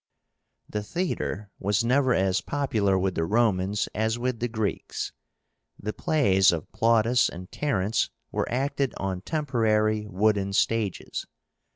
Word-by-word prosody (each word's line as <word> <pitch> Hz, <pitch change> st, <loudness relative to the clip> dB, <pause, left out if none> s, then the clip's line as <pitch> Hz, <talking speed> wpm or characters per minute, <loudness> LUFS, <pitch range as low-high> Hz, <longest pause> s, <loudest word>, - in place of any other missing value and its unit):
The 105 Hz, -, -3 dB
THEATRE 105 Hz, -, -3 dB
was 105 Hz, +3 st, +1 dB
never 130 Hz, +1 st, +3 dB
as 95 Hz, -1 st, +2 dB
popular 110 Hz, -9 st, +1 dB
with 95 Hz, 0 st, 0 dB
the 80 Hz, -, -1 dB
Romans 100 Hz, 0 st, +1 dB
as 110 Hz, +2 st, 0 dB
with 125 Hz, -1 st, -2 dB
the 120 Hz, -, 0 dB
Greeks. 110 Hz, -3 st, -3 dB, 0.7 s
The 105 Hz, +1 st, -4 dB
plays 95 Hz, -13 st, +3 dB
of 80 Hz, -3 st, -4 dB
Plautus 115 Hz, +2 st, +3 dB
and 90 Hz, +1 st, -9 dB
Terence 110 Hz, -8 st, 0 dB, 0.2 s
were -, -, -2 dB
acted 135 Hz, +1 st, -1 dB
on 95 Hz, -2 st, -3 dB
temporary 110 Hz, -, +1 dB
wooden 100 Hz, 0 st, +1 dB
stages. 110 Hz, -2 st, -1 dB
110 Hz, 130 wpm, -26 LUFS, 95-120 Hz, 0.7 s, never